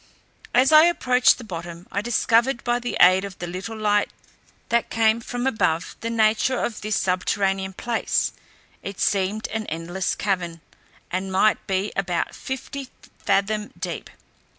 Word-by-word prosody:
As 260 +4 +5
I 310 +1 +9
approached 255 -7 +4
the 250 - -9
bottom, 170 -3 -7
I 200 - -1
discovered 235 +2 +2
by 240 0 +1
the 245 0 -3
aid 185 +2 +6
of 195 -2 -7
the 175 - -5
little 185 +6 -6
light 210 -1 +2 0.6
that 235 0 +1
came 225 0 +2
from 245 +2 -4
above 170 -10 0
the 230 - -2
nature 225 +3 +2
of 235 - -3
this 215 0 -1
subterranean 190 +1 0
place, 235 +4 -1 0.5
it 195 -1 -7
seemed 200 +2 0
an 220 -1 -4
endless 170 +4 -2
cavern, 175 -4 -2 0.5
and 190 +2 -2
might 195 +3 +2
be 195 +2 -1
about 180 -3 -1
fifty 265 0 -6 0.3
fathom 210 +1 0
deep. - - -5
210 Hz, 150 wpm, -23 LUFS, 185-235 Hz, 0.6 s, I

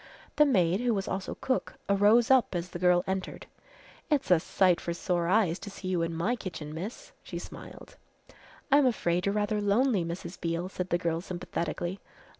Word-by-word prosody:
The 300 - +6
maid 185 -7 +3
who 245 -2 +1
was 195 -1 -2
also 190 0 -3
cook 260 - -1
arose 210 +5 +4
up 255 -7 +4
as 175 +1 -3
the 175 - -7
girl 180 0 +4
entered. 190 0 -4 0.6
"It's 285 -9 +1
a 175 - +7
sight 180 +1 +2
for 170 - -3
sore 175 -1 -1
eyes 185 -3 +2
to - - -8
see 190 -1 -7
you 180 -2 +1
in 165 0 -1
my 170 +9 0
kitchen, 160 -9 -7
miss," 195 - -7
she - - -7
smiled. - - -10 0.7
"I'm 280 -1 +6
afraid 180 -6 0
you're 200 - 0
rather 210 0 0
lonely, 205 0 +2
Mrs. 170 +2 -6
Beale," 170 +1 -2
said 180 -1 -4
the 175 - +2
girl 170 -1 -1
sympathetically. 180 0 -4
185 Hz, 185 wpm, -29 LUFS, 175-210 Hz, 0.7 s, a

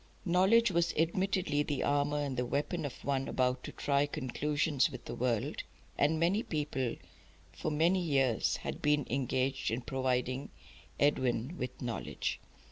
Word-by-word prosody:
Knowledge 190 +5 +4
was 170 -1 +1
admittedly 170 -2 +1
the 145 -2 -1
armour 145 +1 +1
and 140 -2 -2
the 125 - 0
weapon 145 +6 -1
of 140 - -7
one 135 -1 0
about 125 0 0
to - - -6
try 140 0 +1
conclusions 145 +1 0
with - - -9
the - - -5
world, 120 -3 -1 0.3
and 155 +2 +2
many 180 +6 +2
people 145 - -2 0.6
for - - -3
many 165 +5 +3
years 135 -8 +2
had - - -5
been 150 -2 +2
engaged 130 +1 0
in 115 +3 -1
providing 130 +1 -1 0.5
Edwin 130 0 +1
with 125 -4 -5
knowledge. 120 -2 -3
145 Hz, 145 wpm, -32 LUFS, 130-160 Hz, 0.6 s, Knowledge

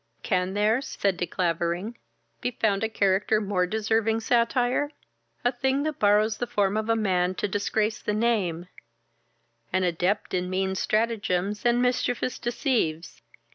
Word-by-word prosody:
"Can 185 -1 0
there 215 +4 +2
(said 200 -7 -1
De 175 - -2
Clavering) 175 +5 -1 0.5
be - - 0
found 220 -4 0
a 220 - 0
character 205 0 +2
more 195 -3 0
deserving 220 +2 0
satire? 245 +4 +1 0.6
a 245 - +4
thing 265 +2 0
that 310 0 -3
borrows 210 +1 +3
the 245 - -2
form 200 -2 +1
of 215 0 -1
man 185 -3 +1
to 210 - -1
disgrace 210 +2 -1
the - - -2
name, 205 -7 0 1.1
an 185 +1 +1
adept 180 +4 0
in 180 0 -1
mean 190 +1 0
stratagems 210 -1 0
and 240 +1 +3
mischievous 250 0 0
deceives. 235 - -1
210 Hz, 140 wpm, -26 LUFS, 185-230 Hz, 1.1 s, a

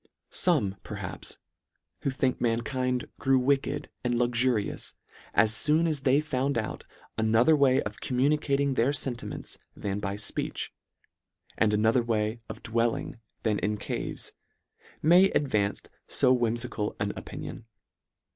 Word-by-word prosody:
Some, 125 - +2
perhaps, - - -6 0.6
who - - 0
think 130 -1 0
mankind 125 +2 0
grew 135 0 +3
wicked 140 +2 +1 0.2
and 120 -1 +1
luxurious 120 -2 0 0.4
as 110 +1 +4
foon 155 +3 +3
as 155 -3 0
they 135 +2 +3
found 140 -3 -1
out 110 -1 -3 0.3
another 115 +7 +5
way 135 -3 +4
of - - -6
com 125 - -2
LETTER 135 +3 +4
VII. 150 - +3
75 140 -2 +1
municating 140 -1 +1
their 125 +5 +3
fentiments 125 -3 -3 0.2
than 100 0 -2
by 100 -1 -2
fpeech, 105 - -3 0.9
and 110 -2 +3
another 110 +4 +3
way 110 0 -1
of - - -8
dwelling 115 0 -1 0.2
than 105 -2 +1
in 105 0 -1
caves, - - -4 0.7
may 175 +5 +7
advance 105 - 0 0.2
fo 130 - +4
whimfical 115 -2 -1
an 100 0 -1
opinion. 115 - -8
125 Hz, 135 wpm, -28 LUFS, 110-135 Hz, 0.9 s, may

